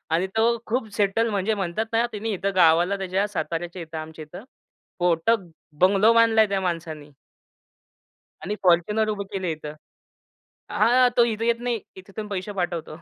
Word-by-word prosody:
आणि 180 Hz, +3 st, 0 dB
तो 235 Hz, +1 st, +3 dB
खूप 235 Hz, 0 st, -2 dB
सेटल, 215 Hz, +3 st, +1 dB
म्हणजे 205 Hz, +1 st, 0 dB
म्हणतात 195 Hz, +2 st, -2 dB
ना, 230 Hz, +1 st, +3 dB
त्यानी 220 Hz, +1 st, -4 dB
इथं 195 Hz, 0 st, -2 dB
गावाला 175 Hz, +2 st, +4 dB
त्याच्या 190 Hz, +1 st, -1 dB
साताऱ्याच्या 175 Hz, -2 st, -4 dB
इथं 160 Hz, 0 st, -8 dB
आमच्या 155 Hz, 0 st, -8 dB
इथं 175 Hz, +7 st, -11 dB, 0.6 s
पोटक-बंगलो 180 Hz, +2 st, +2 dB
बांधला 230 Hz, -1 st, +5 dB
आहे 215 Hz, -, +2 dB
त्या 195 Hz, -1 st, 0 dB
माणसाने. 160 Hz, -5 st, -4 dB, 1.3 s
आणि 200 Hz, +6 st, -3 dB
फॉर्च्युनर 210 Hz, +5 st, +3 dB
उभं 200 Hz, -1 st, -2 dB
केलं 190 Hz, -2 st, -3 dB
इथं. 155 Hz, -2 st, -5 dB, 1.0 s
हा, 245 Hz, +3 st, +4 dB
तो 240 Hz, -, +7 dB
इथं 225 Hz, -1 st, -2 dB
येत 235 Hz, 0 st, +1 dB
नाही. 240 Hz, -2 st, -1 dB, 0.2 s
इथं 190 Hz, +1 st, -13 dB
पण 215 Hz, -, -4 dB
पैसे 195 Hz, +1 st, -4 dB
पाठवतो. 175 Hz, -4 st, -4 dB
195 Hz, 155 wpm, -24 LUFS, 170-220 Hz, 1.3 s, तो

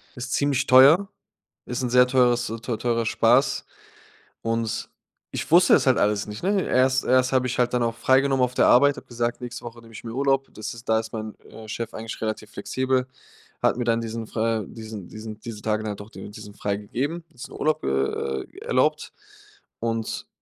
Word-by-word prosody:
Ist 130 Hz, +1 st, -6 dB
ziemlich 140 Hz, -2 st, +1 dB
teuer. 145 Hz, +10 st, +7 dB, 0.6 s
Ist 125 Hz, +1 st, -3 dB
'n 125 Hz, -, 0 dB
sehr 125 Hz, 0 st, +6 dB
teures 125 Hz, -1 st, +3 dB
teu 115 Hz, -3 st, -3 dB
teurer 115 Hz, -1 st, 0 dB
Spaß. 120 Hz, +5 st, +3 dB, 0.8 s
Und 115 Hz, 0 st, 0 dB
s 110 Hz, -, -4 dB, 0.5 s
ich -, -, -4 dB
wusste -, -, +7 dB
es -, -, +1 dB
halt -, -, +5 dB
alles 105 Hz, 0 st, +1 dB
nicht, 105 Hz, +8 st, -8 dB
ne? 195 Hz, 0 st, +2 dB
Erst 130 Hz, +1 st, +2 dB
erst 130 Hz, 0 st, +3 dB
habe 130 Hz, -1 st, +2 dB
ich 120 Hz, -, -3 dB
halt 125 Hz, 0 st, +2 dB
dann 125 Hz, -1 st, +2 dB
auch 115 Hz, 0 st, -1 dB
freigenommen 130 Hz, +2 st, +3 dB
auf 125 Hz, 0 st, 0 dB
der -, -, +4 dB
Arbeit, 145 Hz, +3 st, +5 dB
habe -, -, -11 dB
gesagt, 120 Hz, 0 st, -2 dB
nächste 120 Hz, -1 st, -7 dB
Woche 120 Hz, 0 st, -8 dB
nehme 115 Hz, 0 st, -16 dB
ich -, -, -10 dB
mir 115 Hz, -, -6 dB
Urlaub. 135 Hz, +1 st, +1 dB
Das 110 Hz, -, -6 dB
ist 115 Hz, 0 st, -12 dB
da 110 Hz, 0 st, +4 dB
ist 110 Hz, 0 st, -7 dB
mein, 110 Hz, -1 st, -5 dB
äh, 110 Hz, -1 st, -12 dB
Chef 115 Hz, +1 st, -4 dB
eigentlich 110 Hz, 0 st, -6 dB
relativ 110 Hz, -1 st, -4 dB
flexibel, 130 Hz, +4 st, -1 dB, 0.5 s
hat -, -, +2 dB
mir 120 Hz, -, -2 dB
dann 115 Hz, 0 st, +2 dB
diesen 115 Hz, -1 st, -5 dB
fr 110 Hz, 0 st, 0 dB
äh -, -, -11 dB
diesen 110 Hz, -5 st, -8 dB
diesen 110 Hz, 0 st, -8 dB
diese 110 Hz, -2 st, -7 dB
Tage 110 Hz, 0 st, -1 dB
dann 105 Hz, -1 st, -3 dB
doch 100 Hz, +2 st, -10 dB
diesen 105 Hz, 0 st, -10 dB
freigegeben. 120 Hz, +13 st, -3 dB
Diesen 125 Hz, -, -10 dB
Urlaub, 155 Hz, +1 st, 0 dB
äh, 65 Hz, 0 st, -1 dB
äh, -, -, -19 dB
erlaubt. -, -, 0 dB, 0.7 s
Und 115 Hz, -1 st, -3 dB
115 Hz, 200 wpm, -24 LUFS, 110-130 Hz, 0.8 s, teuer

